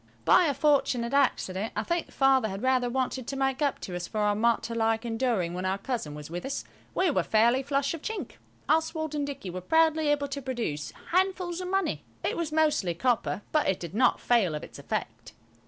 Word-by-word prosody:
By 360 - +6
a 285 -4 +1
fortunate 270 -5 +2
accident–I 215 -6 +1
think 340 +7 -2
Father 270 -3 +3
had 195 +4 -6
rather 255 -1 +2
wanted 260 0 -2
to 275 - -3
make 270 +1 0
up 285 -2 +1
to 180 - -5
us 175 0 -4
for 220 - -7
our 210 0 +3
martyr 230 +2 +1
like 225 0 +1
enduring 225 -7 0
when 180 +1 -4
our 190 +1 0
cousin 200 - -4
was 150 0 -8
with 175 +2 -5
us–we 305 +5 -2
were - - +2
fairly 235 +4 +3
flush 280 +1 0
of 330 - -6
chink. 440 +4 -5 0.3
Oswald 315 -1 +1
and 290 -1 -1
Dicky 265 -10 -6
were 185 +1 -5
proudly 320 - +3
able 290 -1 +1
to 280 0 -4
produce 235 - -3 0.2
handfuls 370 -1 +1
of 365 - -4
money; 385 +1 -1 0.2
it - - 0
was 335 -2 -2
mostly 305 - +2
copper, 235 -1 0
but 305 -8 +2
it 190 - 0
did 170 -1 -7
not 245 +4 +3
fail 210 -10 +2
of 150 - -5
its - - -10
effect. 115 -4 -5
255 Hz, 205 wpm, -28 LUFS, 205-295 Hz, 0.3 s, By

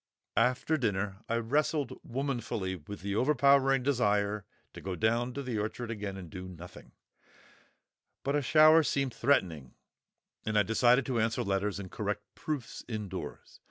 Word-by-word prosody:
After 125 +6 +2
dinner 100 -6 -1
I 115 - +1
wrestled 140 +4 0
womanfully 120 -7 -2
with 95 +4 -9
the 100 +1 -2
overpowering 135 0 +4
desire 105 -6 +1 0.3
to - - -9
go 95 -1 -4
down 115 +4 +1
the 125 -5 -3
orchard 110 +3 -3
again 105 -3 -4
and 90 -2 -8
do 90 +3 -8
nothing; 90 -1 -12 1.3
but 140 +1 0
a 145 - +2
shower 155 +3 +7
seemed 140 -4 0
threatening, 90 - 0 0.7
and 110 0 0
I 105 - +5
decided 120 +4 +4
to 125 -3 0
answer 110 0 0
letters 100 0 -1
and 95 -2 -8
correct - - -3
proofs 145 -7 -5
indoors. 105 -5 -6
115 Hz, 145 wpm, -30 LUFS, 100-135 Hz, 1.3 s, shower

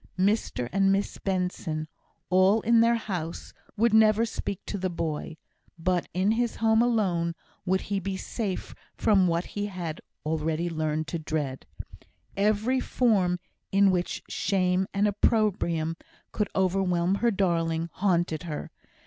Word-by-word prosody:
Mr 190 - +1
and 195 0 +3
Miss 195 +1 -1
Benson, 180 -5 -2 0.4
all 190 +4 +5
in 230 +1 +4
their 235 +1 +4
house, 180 -7 -5 0.2
would 230 +1 +3
never 220 0 +5
speak 200 -3 -5
to 200 - -4
the 185 0 -1
boy 160 -2 -4 0.4
but 175 +1 0
in 185 +3 +1
his 235 +1 0
home 225 0 +3
alone 185 -8 +1 0.3
would 190 +1 +2
he 200 -1 -2
be 190 0 -3
safe 200 -1 -4 0.2
from 195 -4 +3
what 170 +1 0
he 205 0 -4
had 175 -5 -5 0.2
already 160 +2 -1
learnt 155 -1 -1
to 165 +2 -4
dread. 150 -4 -3 0.7
Every 215 +6 +2
form 195 -10 +2 0.3
in 195 0 +5
which 180 -1 -2
shame 185 -1 +1
and 200 +1 +2
opprobrium 190 -6 +1 0.4
could 210 - -1
overwhelm 185 -1 +1
her 235 - +4
darling, 170 -5 0
haunted 175 -5 +1
her. 160 -4 -6
185 Hz, 140 wpm, -27 LUFS, 170-205 Hz, 0.7 s, all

